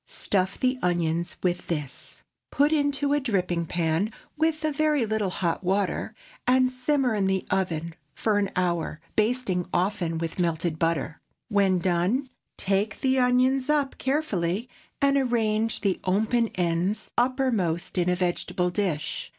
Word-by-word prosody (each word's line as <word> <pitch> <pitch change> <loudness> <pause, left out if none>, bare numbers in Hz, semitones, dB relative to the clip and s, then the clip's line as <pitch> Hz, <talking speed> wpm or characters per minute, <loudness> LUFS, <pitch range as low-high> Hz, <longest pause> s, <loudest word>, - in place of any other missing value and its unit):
Stuff 190 -2 -1
the 255 0 +1
onions 170 -1 0
with 175 -1 -1
this; 150 -5 -5 0.3
put 290 +2 +3
into 285 -1 +1
a 290 - +3
dripping 180 - -1
pan 165 +4 0 0.3
with 315 0 0
a 310 - +1
very 300 -3 +2
little 215 -2 0
hot 180 -1 -1
water, 195 +1 -1 0.3
and 255 0 +4
simmer 255 -1 +1
in 200 -3 +1
the 190 -1 0
oven 170 -3 -1 0.2
for 210 -2 +1
an 200 -1 0
hour, 170 -3 -1 0.2
basting 215 -5 +1
often 175 -3 0
with 165 +2 -4
melted 165 -2 0
butter. 165 -2 -1 0.3
When 200 -3 +3
done, 185 +9 +1 0.3
take 200 +2 0
the 265 -1 +2
onions 255 +2 +3
up 290 -3 +1
carefully, 230 - -1 0.4
and 280 0 +4
arrange 225 -4 +1
the 195 -3 +1
open 220 +5 +2
ends 175 +3 -1
uppermost 240 - 0
in 180 -1 +2
a 180 - +2
vegetable 180 0 -1
dish. 175 -6 -2
200 Hz, 140 wpm, -26 LUFS, 175-255 Hz, 0.4 s, and